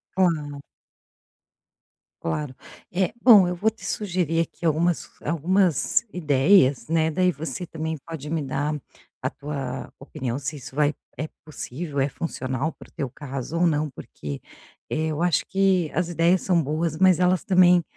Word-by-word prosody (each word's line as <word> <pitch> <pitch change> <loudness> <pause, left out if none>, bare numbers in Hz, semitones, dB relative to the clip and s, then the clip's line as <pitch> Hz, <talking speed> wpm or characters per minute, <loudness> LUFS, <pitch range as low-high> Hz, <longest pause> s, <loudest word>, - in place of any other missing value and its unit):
Claro. 150 -6 +1 1.6
Claro. 130 - -3 0.4
Eh, 180 0 0
bom, 210 -7 +8
eu 180 - -1
vou 205 +5 +2
te 225 +1 -13
sugerir 175 -5 -1
aqui 170 - -9
algumas 165 +2 +1
algumas 170 - +2
ideias, 145 -4 +4
né, 160 0 +2
daí 180 +3 +3
você 160 +1 -5
também 160 0 -4
pode 155 -3 -6
me 160 0 0
dar 145 +2 -1 0.5
a - - 0
tua 140 -1 -5
opinião 125 -1 -4
se 145 +2 -4
isso 135 -1 -10
vai 150 0 +3 0.2
é 155 - -3 0.2
possível, 150 0 -5
é 135 - +2
funcional 135 -1 -3
para - - -14
o - - -29
teu 135 - -4
caso, 140 +4 -5
ou 175 - +4
não. 155 -1 +1
Porque, 75 - -7 0.5
eh, 155 +1 0
eu 155 +1 -2
acho 175 -3 +2
que 190 -4 +2
as 175 0 0
ideias 175 +2 +3
são 175 -3 +2
boas, 155 +2 -1
mas 185 -2 +5
elas 180 0 +3
também 180 -2 +5
160 Hz, 155 wpm, -24 LUFS, 145-180 Hz, 1.6 s, bom